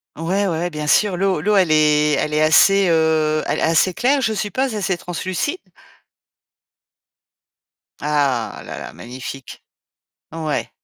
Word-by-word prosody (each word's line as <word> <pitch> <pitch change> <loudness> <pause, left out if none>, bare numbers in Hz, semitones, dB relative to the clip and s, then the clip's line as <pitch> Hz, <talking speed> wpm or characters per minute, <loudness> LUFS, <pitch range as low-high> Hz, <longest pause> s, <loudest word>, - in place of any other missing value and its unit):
Ouais, 185 +5 -1
ouais, - - 0
ouais, 170 0 -2
bien 150 -2 -5
sûr 185 +4 +2
l'eau 190 -4 0
l'eau 210 +4 +1
elle 180 -5 +3
est 150 -1 +3
elle 150 - -2
est 155 - +2
assez, 195 +5 +5
heu, 160 -1 +2
a - - -1
assez 165 +3 +2
claire 270 +2 +1
je 220 -3 0
suppose, 220 +5 -2
assez 195 -3 -1
translucide? 185 - -4 2.4
Ah 140 -6 -1
là - - -7
là, - - -9
magnifique! 130 +2 -9 0.7
Ouais. 160 -2 -3
165 Hz, 140 wpm, -19 LUFS, 150-195 Hz, 2.4 s, assez